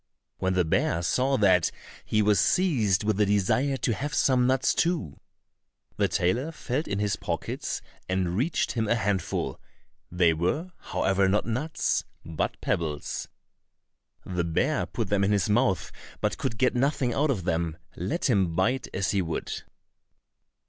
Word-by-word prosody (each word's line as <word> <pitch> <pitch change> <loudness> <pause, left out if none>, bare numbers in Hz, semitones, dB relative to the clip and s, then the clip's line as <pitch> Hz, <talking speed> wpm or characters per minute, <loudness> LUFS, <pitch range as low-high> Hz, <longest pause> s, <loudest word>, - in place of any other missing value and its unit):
When 95 0 0
the 90 -2 +3
bear 80 +1 +1
saw 130 +9 +2
that, 95 -6 +4 0.3
he 105 0 +1
was 105 -2 +4
seized 110 - +2
with 105 -1 +1
a - - +5
desire 125 +8 +2
to 115 -1 0
have 145 +8 -3
some 125 -2 +3
nuts 130 0 +2
too. 165 - -1 0.8
The 100 - +3
tailor 100 - 0
felt 145 -1 -3
in 100 - -2
his 105 -1 0
pockets, - - -3 0.3
and 90 -2 0
reached 135 - 0
him 110 -3 -1
a 115 - +3
handful; 100 -5 -1 0.5
they 90 -2 +4
were, 90 - -1
however, 95 0 +1
not 105 +2 +1
nuts, 130 +8 -1 0.2
but 80 -1 -3
pebbles. 75 -4 -2 1.0
The 90 -1 -1
bear 85 -1 0
put - - -3
them 100 -1 +2
in 100 - +2
his 100 -4 +2
mouth, 120 -4 +1 0.3
but - - -1
could 110 - -2
get 125 +2 +2
nothing 130 -1 +1
out 150 +5 +1
of 110 -10 0
them, 80 -2 -1 0.2
let 95 - -1
him 95 -9 +2
bite 125 +8 +1
as 95 0 0
he 100 - +1
would. 80 -2 -3
105 Hz, 155 wpm, -27 LUFS, 90-130 Hz, 1.0 s, a